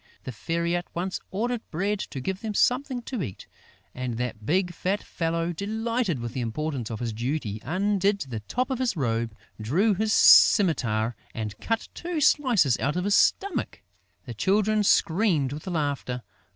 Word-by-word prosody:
The 130 - -5
Fairy 170 +9 -1
at 175 0 -3
once 180 +2 -2
ordered 235 +4 -2
Bread 200 +5 -1
to 135 - -5
give 190 +8 -3
them 215 -2 -4
something 250 +1 +1
to 245 -3 -4
eat; 95 - -6 0.5
and 125 -2 -4
that 115 -3 -4
big, 180 +2 +1
fat 190 +4 -2
fellow, 165 0 -2
delighted 220 - -1
with 120 -1 -5
the 130 - -3
importance 125 +1 -3
of 110 -2 -5
his 115 -2 -2
duty, 115 -2 -3
undid 200 +5 +1
the 125 -6 -4
top 250 - -2
of 260 - -1
his 245 -8 0
robe, 115 -4 -1 0.3
drew 180 - +2
his 215 +3 0
scimitar 110 - +5 0.2
and 105 -2 -4
cut 225 0 -2
two 345 -2 -4
slices 245 - +3
out 145 +2 0
of 180 - -1
his 205 +1 +1
stomach. 390 - +1 0.4
The 120 - -6
Children 210 - +2
screamed 165 - +2
with 150 +5 -8
laughter. 145 -7 -2
170 Hz, 165 wpm, -26 LUFS, -, 0.5 s, scimitar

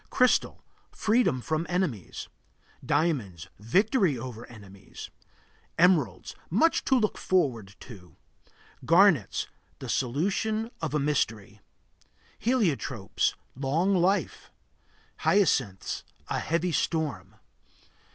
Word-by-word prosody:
Crystal 255 0 +2 0.3
Freedom 215 - +1
from 155 +4 -2
enemies. 175 - -2 0.6
Diamonds 120 - -1
Victory 185 - +2
over 120 -1 -8
enemies. 100 -4 -12 0.7
Emeralds 160 - +2
Much 315 - +2
to 265 - +3
look 215 -4 0
forward 120 - 0
to. 95 -7 -13 0.7
Garnets 165 - +4 0.3
The - - -8
solution 200 - -1
of 155 -2 -2
a - - +2
mystery. 130 -8 -1 0.8
Heliotropes 170 - 0 0.2
Long 150 +9 +1
life. 190 +2 0 0.7
Hyacinths 135 - +1 0.3
A - - -1
heavy 170 +2 -1
storm. 150 - -2
155 Hz, 90 wpm, -27 LUFS, 115-190 Hz, 0.8 s, Garnets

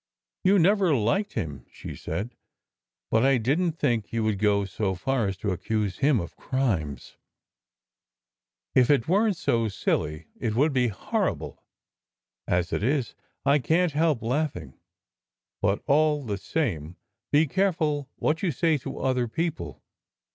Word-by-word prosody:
"You 195 +1 +5
never 190 -2 +4
liked 135 - 0
him," 75 - -4
she - - -9
said, 115 +5 -4 0.8
"but 110 +1 +3
I 135 0 +4
didn 145 +10 +1
t 165 - -7
think 120 -8 0
you 115 -1 -1
would 110 -3 0
go 100 -1 +2
so 95 0 -2
far 120 +4 0
as 95 -1 -3
to 105 +1 -2
accuse 100 +1 -2
him 140 -4 +3
of 85 - -6
crimes. 90 - -2 1.6
If 125 -2 +4
it 140 -6 +3
weren 205 +5 +3
t - - -15
so 115 -9 +1
silly, 75 -5 -1
it 110 -2 -1
would 145 +4 +3
be 125 -2 +3
horrible. 105 - -3 0.8
As 90 0 0
it - - 0
is, 130 +1 0 0.3
I 140 +1 +4
can 165 +7 +2
t - - -14
help 155 -7 +2
laughing; 115 - -2 0.9
but 100 0 +1
all 150 0 +3
the 100 -3 -3
same, 90 - -2 0.4
be 150 +2 +5
careful 155 -4 0
what 155 +2 0
you 190 - +1
say 160 +2 +1
to - - -7
other 125 -2 +1
people. 165 +7 -4
125 Hz, 155 wpm, -26 LUFS, 105-155 Hz, 1.6 s, You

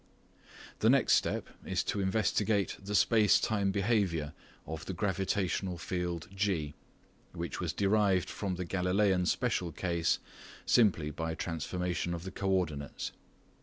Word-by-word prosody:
The - - +4
next - - +4
step - - +1 0.2
is - - -1
to 100 - -1
investigate 100 +1 +1
the 105 +1 -3
space 105 -2 +5
time 100 -3 +1
behaviour 95 -7 0 0.3
of 80 +1 -6
the 95 - -4
gravitational 95 -1 -1
field 90 -1 -3
G, 95 -7 -1 0.6
which 85 -4 -4
was - - -1
derived 100 -3 +2
from 95 -2 -3
the 90 0 -4
Galileian 90 +1 +2
special 95 -9 0
case 85 0 0 0.5
simply 90 -10 +3
by 80 +1 -3
transformation 85 +2 -2
of 85 - -7
the 95 - -6
coordinates. 90 -8 -2
95 Hz, 130 wpm, -31 LUFS, 85-100 Hz, 0.6 s, space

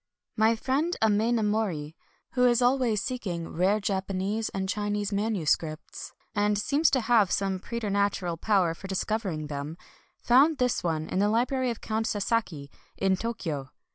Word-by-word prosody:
My 220 +1 +4
friend 280 +9 -1
Amenomori, 210 -7 +1 0.4
who 250 -1 +3
is 240 -1 +3
always 245 -4 +2
seeking 185 -10 -4
rare 190 +5 +2
Japanese 195 +2 -2
and 190 0 -3
Chi 205 +1 -2
nese 205 0 -1
MSS., 175 -7 -1 0.2
and 205 0 +1
seems 285 +9 +2
to 260 - +1
have 225 -4 +4
some 195 0 0
preter 235 +1 -4
natural 200 -3 0
power 185 -1 +2
for 195 +4 -10
discovering 190 -4 -2
them, 145 +2 -5 0.4
found 280 +6 +4
this 250 -1 0
one 160 -2 -1
in 185 - -1
the 205 +1 +3
library 250 +3 +1
of 235 - -4
Count 220 +1 -1
Sasaki 200 -9 -1 0.3
in 190 -1 +2
Tokyo. 170 - -4
205 Hz, 150 wpm, -27 LUFS, 185-230 Hz, 0.4 s, My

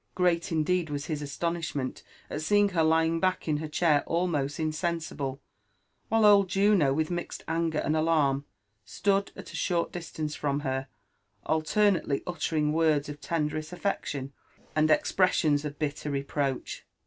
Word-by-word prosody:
Great 175 -2 +1
indeed 165 +1 +1
was 145 -1 -3
his 155 -3 -3
astonishment 150 -2 -3 0.3
at 150 - -4
seeing 205 +5 +3
l^er 170 -4 +1
lying 165 +1 +2
back 185 0 0
in 150 -1 +1
her 155 +1 -4
chair 150 -1 +3
almost 160 -5 0
insensible, 155 -4 -2 0.7
while 225 0 +3
pld 200 -2 +7
Juno 195 -6 +3
with 155 +4 0
mixed 175 0 -4
anger 165 -1 0
and 155 +1 0
alarm 155 -4 +2 0.4
stood 200 0 0
at - - -10
a - - -7
short 170 -2 0
distance 160 -3 -5
from 145 -1 -1
her, 130 -1 -2 0.6
alternately 160 -1 +1
uttering 155 -3 0
words 155 -2 +2
of 145 0 -8
tenderest 155 -1 -2
affection, 140 -7 -3 0.4
and 155 0 +3
expressions 155 -3 +3
of 145 -1 -5
bitter 150 -1 -3
reproach. 140 -1 -2
155 Hz, 145 wpm, -28 LUFS, 145-175 Hz, 0.7 s, pld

